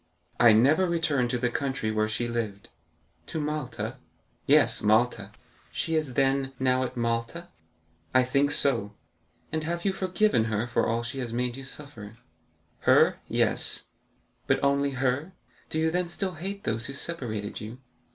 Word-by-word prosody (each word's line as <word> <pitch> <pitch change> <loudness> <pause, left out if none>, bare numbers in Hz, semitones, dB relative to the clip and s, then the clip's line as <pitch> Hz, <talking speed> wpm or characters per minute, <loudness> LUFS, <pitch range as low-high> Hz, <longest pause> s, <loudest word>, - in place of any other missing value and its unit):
"I 120 -1 +8
never 140 +12 +4
returned 150 -7 +1
to 125 - 0
the 125 0 -1
country 130 -4 -2
where 110 0 0
she 120 +2 -2
lived." 110 -4 -4 0.6
"To 160 - -4
Malta?" 150 -4 -4 0.5
"Yes; - - +5
Malta." 110 -1 +2 0.4
"She 165 - -2
is, 155 -6 -1
then, 135 0 +1
now 130 0 +2
at 130 0 -4
Malta?" 115 +9 -2 0.6
"I 130 0 +4
think 140 +3 +2
so." 120 -8 +4 0.6
"And 160 0 -2
have 170 +2 -3
you 195 - +2
forgiven 185 - +1
her 110 0 -1
for 120 - 0
all 115 +1 0
she 125 +3 -5
has 120 -3 -4
made 120 0 -2
you 135 - -8
suffer?" 130 -6 -8 0.6
"Her,—yes." - - +2 0.6
"But - - +1
only 140 0 +2
her; 135 +7 -1 0.4
do - - -3
you 160 0 +1
then 180 0 -1
still 185 +2 -3
hate 195 +5 -6
those 115 +2 -1
who 135 - -6
separated 120 -10 -4
you?" 110 +3 -8
130 Hz, 155 wpm, -27 LUFS, 115-155 Hz, 0.6 s, I